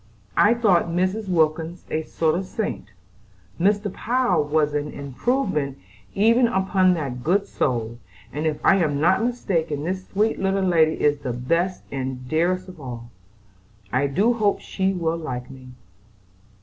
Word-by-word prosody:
I 220 +3 +5
thought 205 -7 +3
Mrs. 185 +4 -1
Wilkins 160 0 0
a 155 - 0
sort 160 0 0
of 185 +3 -2
saint, 215 - -4 0.7
Mr. 205 +2 +1
Power 240 -9 +1
was 150 0 +1
an 150 0 -1
improvement 145 - -1 0.4
even 230 +4 +4
upon 190 -3 +2
that 130 -6 -4
good 190 +7 +2
soul, 120 -3 -2 0.3
and 150 +2 -1
if 150 -1 -1
I 195 - +6
am 150 -6 +1
not 175 +7 +3
mistaken 170 -11 -1
this 185 +3 -3
sweet 215 +3 0
little 195 0 +1
lady 160 -3 +4
is 145 -1 +2
the 130 -4 -3
best 170 +10 -1
and 130 -1 -4
dearest 180 +5 0
of 180 -4 -12
all. 120 -2 -8 0.8
I 135 +3 +2
do 200 - +2
hope 210 -3 +1
she 190 0 -1
will 170 -3 -1
like 125 -6 -5
me." 130 -1 -12
170 Hz, 150 wpm, -23 LUFS, 145-195 Hz, 0.8 s, I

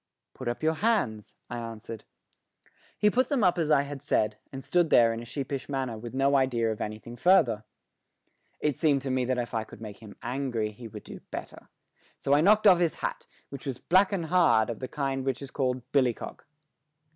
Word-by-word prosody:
"Put 130 - -8
up 120 +5 -3
your 160 +1 +3
hands," 160 - 0
I 120 - -5
answered. 115 -1 -8 0.9
He 210 - +3
put 255 +3 +2
them 275 -6 +1
up 180 -1 +3
as 160 -2 0
I 145 -2 +4
had 140 -1 -7
said, 105 -7 +1
and 135 0 -8
stood 175 0 +2
there 115 -1 +5
in 115 - -5
a - - -9
sheepish 135 +2 -4
manner 135 -4 -2
with 115 +3 -8
no 135 +1 +3
idea 120 -4 +2
of 110 - -5
anything 110 +3 -6
further. 120 - +3 0.9
It 150 -4 -1
seemed 145 -4 +2
to 135 - -2
me 130 -1 +1
that 130 0 0
if 120 -1 -3
I 110 - 0
could 110 - -13
make 105 -2 -9
him 110 -2 -12
angry 120 -4 -2
he 115 +2 -10
would 105 -1 -10
do - - -10
better, - - -8 0.5
so 140 - 0
I 145 - +5
knocked 210 +5 +5
off 185 -4 +7
his 170 -2 +1
hat, - - -4 0.2
which 140 +1 -8
was 130 -3 -3
black 190 +7 +3
and 185 -5 -1
hard, 160 -10 +3
of 115 - -7
the 130 - -4
kind 135 -1 -2
which 135 -1 -1
is 140 -1 -9
called 130 -3 -1
billy 130 -5 +3
cock. - - -9
130 Hz, 215 wpm, -28 LUFS, 115-150 Hz, 0.9 s, off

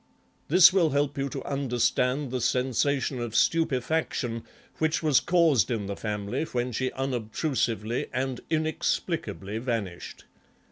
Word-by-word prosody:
This 180 +3 +7
will 175 -5 +4
help 145 0 0
you 140 0 -2
to - - -6
understand 125 0 0
the 130 -1 -2
sensation 130 +2 0
of 120 -2 -4
stupefaction 135 -6 0 0.4
which 160 +1 +1
was 150 -4 +5
caused 165 - +3
in 110 -4 -2
the 100 0 -4
family 105 +6 -3
when 125 -3 -2
she 130 +2 -1
unobtrusively 120 -2 -2
and 130 0 -2
inexplicably 155 - -2
vanished. 115 -8 -4
130 Hz, 125 wpm, -27 LUFS, 115-150 Hz, 0.4 s, This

